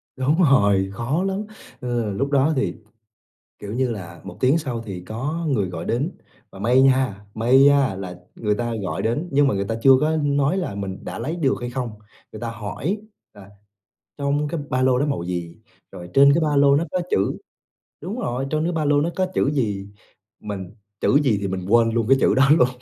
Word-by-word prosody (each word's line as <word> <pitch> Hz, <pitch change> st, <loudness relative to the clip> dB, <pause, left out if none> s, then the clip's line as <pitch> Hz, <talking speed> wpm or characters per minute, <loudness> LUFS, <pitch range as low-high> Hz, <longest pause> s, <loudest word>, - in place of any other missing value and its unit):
Đúng 145 Hz, +7 st, +2 dB
rồi, 100 Hz, -, +3 dB
khó 130 Hz, -, -1 dB
lắm, 195 Hz, +1 st, -2 dB, 0.4 s
ừ, 120 Hz, -4 st, -2 dB
lúc 135 Hz, +8 st, -1 dB
đó 140 Hz, +3 st, +3 dB
thì, 135 Hz, -, 0 dB, 0.9 s
kiểu 105 Hz, 0 st, -7 dB
như 130 Hz, 0 st, 0 dB
là, 85 Hz, -6 st, -7 dB
1 90 Hz, -1 st, -9 dB
tiếng 135 Hz, +6 st, +3 dB
sau 125 Hz, -7 st, -4 dB
thì 95 Hz, -5 st, -7 dB
có 145 Hz, -, -3 dB
người 105 Hz, -9 st, 0 dB
gọi 85 Hz, -1 st, -6 dB
đến 135 Hz, +9 st, -1 dB, 0.4 s
và 95 Hz, -, -13 dB
may 125 Hz, +6 st, +3 dB
nha, 130 Hz, -7 st, +2 dB
may 120 Hz, +4 st, +4 dB
nha 140 Hz, -6 st, +4 dB
là 95 Hz, -2 st, -6 dB, 0.2 s
người 105 Hz, -2 st, -1 dB
ta 120 Hz, +1 st, -2 dB
gọi 95 Hz, -, -3 dB
đến, 120 Hz, +10 st, -1 dB
nhưng 140 Hz, 0 st, +4 dB
mà -, -, 0 dB
người 100 Hz, 0 st, -1 dB
ta 110 Hz, +3 st, -3 dB
chưa 135 Hz, -, +6 dB
có 155 Hz, +1 st, +1 dB
nói 145 Hz, +2 st, +1 dB
là 175 Hz, -, -3 dB
mình 95 Hz, -1 st, -5 dB
đã -, -, -6 dB
lấy 155 Hz, +9 st, -3 dB
được 135 Hz, -6 st, +1 dB
hay 120 Hz, 0 st, -4 dB
không. 125 Hz, -2 st, -3 dB, 0.4 s
Người 110 Hz, -, -9 dB
ta 120 Hz, -1 st, -3 dB
hỏi 115 Hz, -, -4 dB, 0.4 s
là 100 Hz, -1 st, -14 dB, 0.7 s
trong 145 Hz, +1 st, 0 dB
cái 165 Hz, 0 st, -3 dB
ba 130 Hz, -, 0 dB
lô 130 Hz, -1 st, +3 dB
đó 145 Hz, -, +1 dB
màu 140 Hz, -13 st, -2 dB
gì, 85 Hz, -2 st, -4 dB, 0.4 s
rồi 90 Hz, -2 st, -9 dB
trên 140 Hz, +1 st, +7 dB
cái 165 Hz, -, +2 dB
ba 150 Hz, -2 st, +1 dB
lô 140 Hz, 0 st, +5 dB
nó 155 Hz, -, +2 dB
có 180 Hz, -, 0 dB
chữ 95 Hz, -, +1 dB, 0.6 s
đúng 195 Hz, +9 st, -5 dB
rồi, 130 Hz, -, -2 dB
trong 155 Hz, 0 st, 0 dB
cái 175 Hz, -, 0 dB
ba 160 Hz, -2 st, -1 dB
lô 145 Hz, 0 st, +3 dB
nó 165 Hz, +4 st, 0 dB
có 185 Hz, -, +1 dB
chữ 140 Hz, -, +2 dB
gì, 105 Hz, -8 st, -1 dB, 0.5 s
mình 100 Hz, -3 st, -6 dB, 0.3 s
chữ 140 Hz, -, +4 dB
gì 110 Hz, -6 st, +2 dB
thì 100 Hz, -, -2 dB
mình 95 Hz, -1 st, -4 dB
quên 115 Hz, +1 st, +4 dB
luôn 115 Hz, -1 st, 0 dB
cái 135 Hz, -, +6 dB
chữ -, -, +3 dB
đó 135 Hz, +1 st, +4 dB
luôn. 125 Hz, -, +5 dB
130 Hz, 220 wpm, -22 LUFS, 105-145 Hz, 0.9 s, trên